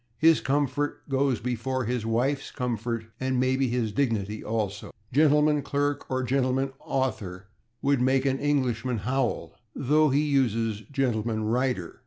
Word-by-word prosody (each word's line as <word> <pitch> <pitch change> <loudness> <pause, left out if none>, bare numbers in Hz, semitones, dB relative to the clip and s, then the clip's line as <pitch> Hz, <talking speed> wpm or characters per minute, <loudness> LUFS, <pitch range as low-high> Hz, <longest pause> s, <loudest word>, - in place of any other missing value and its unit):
His 160 0 +5
comfort 145 +1 -1
goes 135 -3 +1
before 125 +2 -2
his 120 -1 -2
wife's 130 +5 0
comfort, 115 -3 -3
and 130 -1 0
maybe 130 +1 +2
his 120 -3 -1
dignity 110 -4 -1
also. 105 -3 -3 0.2
/Gentleman 150 0 +4
clerk/ 145 +1 -1
or 130 0 -1
/gentleman 135 +1 0
author/ 100 -8 -3 0.4
would 140 -2 +2
make 130 +1 +2
an 135 -1 +1
Englishman 130 -4 0
howl, 115 - -1 0.2
though 150 +3 +3
he 140 +3 +2
uses 115 -7 +1
/gentleman 115 -5 0
rider 125 -8 -1
130 Hz, 135 wpm, -27 LUFS, 115-135 Hz, 0.4 s, His